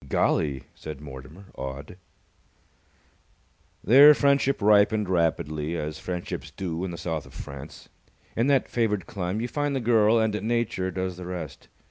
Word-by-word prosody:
"Golly!" 70 -2 +1
said 75 -3 -8
Mortimer, 75 +6 -11
awed. 70 +5 -7 1.9
Their 145 +5 +8
friendship 140 -1 +2
ripened 105 0 +4
rapidly, 80 -2 0
as 75 0 -4
friendships 90 -4 -5
do 85 +2 -4
in 95 - -2
the 85 - -6
South 80 -2 -4
of - - -16
France. 70 +2 -9 0.5
In 115 +3 +1
that 140 -2 +3
favoured 105 -6 0
clime, 95 +4 -3
you 120 - -2
find 145 +2 -2
the - - 0
girl 115 -2 +4
and 110 -1 +1
Nature 110 -5 -1
does 95 0 -4
the 90 -1 -8
rest. 80 -7 -7
90 Hz, 145 wpm, -26 LUFS, 80-110 Hz, 1.9 s, Their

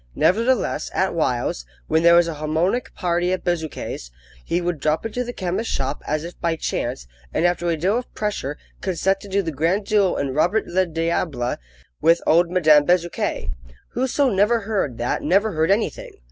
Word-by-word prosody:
Nevertheless, 230 +5 +1
at 190 - +1
whiles, 125 - -1 0.2
when 160 - +2
there 170 0 +6
was 170 0 +5
a 165 - -3
harmonic 160 +10 -1
party 175 -1 0
at 185 - -2
Bezuquet's, 160 - -3 0.3
he 170 - 0
would 175 -3 -2
drop 155 +6 0
into 235 +3 -2
the 245 - -5
chemist's 190 +1 -3
shop, 135 +1 -2
as 155 +1 -1
if 170 +1 -9
by 170 -1 +1
chance, 65 - -3 0.3
and, 170 - +1
after 175 0 +1
a 165 - 0
deal 195 +9 +1
of 250 - -10
pressure, 200 -9 -3 0.2
consent 190 +1 0
to 205 - -11
do 200 0 0
the 165 - -3
grand 170 +8 0
duo 200 -3 +2
in 140 -2 -2
Robert 175 +9 +2
le 185 +1 +1
Diable 165 -6 -1 0.4
with 165 +1 +5
old 170 +2 +4
Madame 155 -5 +5
Bezuquet. 175 +1 0 0.4
Whoso 260 +3 +1
never 215 +3 +2
heard 200 - -2
that 120 +1 -1
never 200 +4 +2
heard 160 -1 +1
anything! 205 +3 0
175 Hz, 180 wpm, -22 LUFS, 155-200 Hz, 0.4 s, there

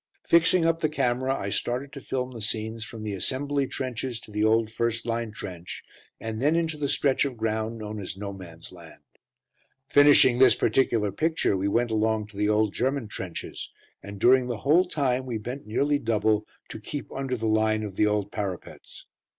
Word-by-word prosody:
Fixing 170 +1 +4
up 165 0 +2
the 155 - +1
camera, 130 -2 0
I 100 - -3
started 125 +7 -2
to 140 - -8
film 130 -1 -3
the 115 -3 -8
scenes 110 +1 -3
from 110 0 -8
the 105 -1 -3
assembly 140 +7 -1
trenches 130 -2 -4
to - - -14
the 105 0 -1
old 110 0 +3
first 115 0 -1
line 115 -1 -2
trench, 90 -4 -8 0.4
and 110 0 -5
then 150 +4 +3
into 165 -2 0
the 150 -1 -2
stretch 135 -1 +2
of 135 -4 -3
ground 110 +1 -2
known 105 -1 -6
as 95 -1 -6
"No 100 0 -5
Man's 85 -4 -11
Land." 85 -3 -14 0.8
Finishing 145 -3 +6
this 130 -4 +7
particular 110 -3 +1
picture, 160 - +1
we 95 +1 -1
went 115 +3 +1
along 110 0 +1
to 100 - -14
the 105 0 +1
old 105 -1 +2
German 130 -3 -1
trenches, 95 -5 -6 0.3
and 100 0 -9
during 125 +3 +5
the 120 -3 -3
whole 165 +6 +5
time 130 -5 -1
we 120 -3 -2
bent 125 +4 -7
nearly 145 +6 +1
double, 110 -2 +1 0.2
to - - -7
keep 140 +7 -6
under 135 -2 -3
the 115 - -4
line 110 0 +2
of 100 -3 -6
the 105 - +3
old 105 -1 -1
parapets. 100 -4 -6
115 Hz, 190 wpm, -26 LUFS, 105-135 Hz, 0.8 s, this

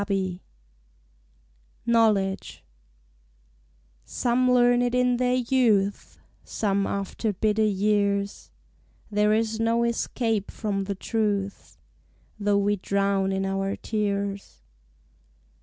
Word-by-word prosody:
Vigils 190 -3 -1 1.5
KNOWLEDGE 215 -5 +1 1.4
Some 250 +1 +1
learn 245 0 +4
it 245 0 0
in 250 -1 +2
their 250 0 +1
youth, 230 -6 +1 0.3
Some 200 -2 -1
after 200 +2 -2
bitter 215 +3 0
y^ars: 200 -1 0 0.6
There 210 0 +2
is 220 0 0
no 230 +1 +2
escape 230 -2 -1
from 200 -3 -3
the 200 0 -3
truth 200 -1 -2 0.6
Though 205 0 +2
we 205 +1 +1
drown 195 0 0
in 195 0 -1
our 195 +1 -1
tears. 200 - -3
205 Hz, 95 wpm, -25 LUFS, 200-230 Hz, 1.5 s, learn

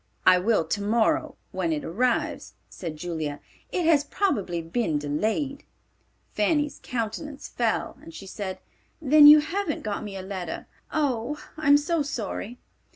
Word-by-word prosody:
"I 180 - +7
will 205 -3 +2
tomorrow 210 +6 +1 0.2
when 180 -3 -1
it 150 -2 -1
arrives," 245 +9 -1 0.2
said 165 -4 -6
Julia. 155 -3 -4 0.3
"It 355 - 0
has 310 -3 +5
probably 205 - -1
been 165 0 -1
delayed." 220 - -1 0.7
Fanny's 295 +8 +1
countenance 250 +5 -4
fell 235 +2 -1
and 325 +2 -11
she 205 - -10
said, 190 -1 -5 0.4
"Then 300 -1 +7
you 300 0 +10
haven't 340 +1 -2
got 210 -1 -3
me 200 -2 -6
a 190 - -6
letter? 185 -3 -5 0.3
Oh, 285 -2 -1 0.2
I'm 290 -2 +5
so 320 +2 0
sorry!" 240 -4 -4
225 Hz, 140 wpm, -26 LUFS, 185-295 Hz, 0.7 s, you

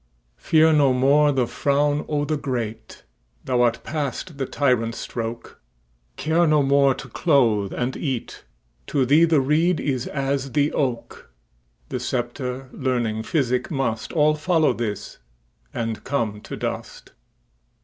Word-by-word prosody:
Fear 160 0 +4
no 140 -3 +4
more 140 +3 +4
the 130 -3 +1
frown 145 +4 0
o' 145 -1 0
the 155 - -1
great, 125 -6 -5 0.4
Thou 125 -1 +1
art 115 -1 +1
past 150 +1 -4
the 135 - -1
tyrant's 125 -5 0
stroke; 115 0 -6 0.6
Care 165 +3 +2
no 150 -2 +4
more 140 -1 +4
to - - -9
clothe 115 - +2
and 125 +1 -2
eat; 130 -6 -4 0.4
To 135 -2 +1
thee 150 +6 +5
the 160 -3 +3
reed 155 +6 +2
is 130 -3 -2
as 135 -1 -2
the 145 0 +2
oak:The - - -6
sceptre, 125 +1 -3
learning, 120 -4 -1
physic, 125 -2 0
mustAll 150 +4 0
follow 160 -4 +2
this, 110 -4 -5 0.5
and 115 -1 -4
come 115 -6 -2
to - - -6
dust. - - -6
135 Hz, 130 wpm, -23 LUFS, 120-150 Hz, 0.6 s, thee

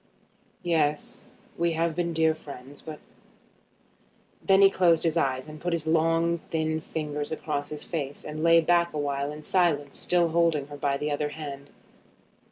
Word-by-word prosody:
"Yes; 155 -3 -1 0.2
we 170 0 +2
have 165 0 0
been 170 -1 -1
dear 160 -1 +3
friends. 140 -3 -11
But 155 -1 -8 0.8
" - - -36
Then 195 0 +5
he 195 - +7
closed 170 -4 +3
his 165 -1 +1
eyes, 130 -4 0
and 155 0 -10
put 175 0 -1
his 165 -2 -1
long 165 +1 +2
thin 160 -1 -1
fingers 150 -1 -4
across 145 -2 -3
his 150 -1 -7
face, 145 -4 -5
and 155 +1 -5
lay 165 0 +6
back 170 +1 +2
awhile 140 -1 -2
in 150 +1 -9
silence, 150 -6 +1
still 175 -1 +2
holding 165 -3 +2
her 145 - -8
by 140 -1 0
the 150 +1 -2
other 150 0 -1
hand. 145 -2 -8
155 Hz, 170 wpm, -27 LUFS, 145-170 Hz, 0.8 s, he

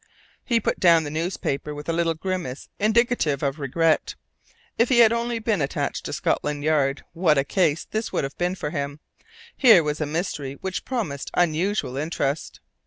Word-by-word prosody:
He 235 -2 +2
put - - -1
down 170 -3 +5
the 145 - -5
newspaper 155 -3 -3
with 145 0 -8
a 165 - 0
little 165 0 +1
grimace 170 -6 -4
indicative 215 - +2
of 140 +2 -1
regret. 155 +4 +1 0.6
If 235 - +2
he 255 - +3
had 230 -1 +7
only 235 0 -1
been 220 -6 0
attached 140 - -2
to - - -4
Scotland 145 -1 -1
Yard, 145 -3 +1
what 165 -3 +3
a 135 - +3
case 160 0 +1
this 220 +1 -3
would - - -1
have 135 - -5
been 180 +1 0
for 150 - -4
him! 145 -1 -4 0.6
Here 220 -10 +7
was 150 +1 -2
a 155 - 0
mystery 150 -4 -3
which 190 -1 -4
promised 195 - -3
unusual 175 -3 0
interest. 150 -1 -2
165 Hz, 175 wpm, -24 LUFS, 145-195 Hz, 0.6 s, had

